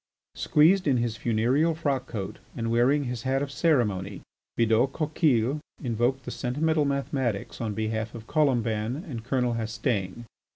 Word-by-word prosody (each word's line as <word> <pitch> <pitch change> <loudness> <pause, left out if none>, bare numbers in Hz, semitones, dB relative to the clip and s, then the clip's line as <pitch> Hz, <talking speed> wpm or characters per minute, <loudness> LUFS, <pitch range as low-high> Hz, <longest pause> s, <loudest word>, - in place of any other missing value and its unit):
Squeezed 175 +4 +3
in 135 -3 +3
his 120 -2 -1
funereal 125 +9 +1
frock 140 -5 -1
coat 100 -5 -5 0.2
and 115 -1 -1
wearing 130 +5 +3
his 125 -3 -4
hat 135 +2 0
of 140 - -5
ceremony, 120 - +1 0.4
Bidault 115 +3 +3
Coquille 150 -4 +1 0.2
invoked 125 +1 0
the - - -5
sentimental 150 +4 0
mathematics 135 -7 -2
on 110 -3 -2
behalf 110 +1 -2
of 115 -1 -9
Colomban 120 -2 0
and 120 -7 -6
Colonel 125 -1 0
Hastaing. 115 -2 -2
125 Hz, 140 wpm, -27 LUFS, 115-140 Hz, 0.4 s, Squeezed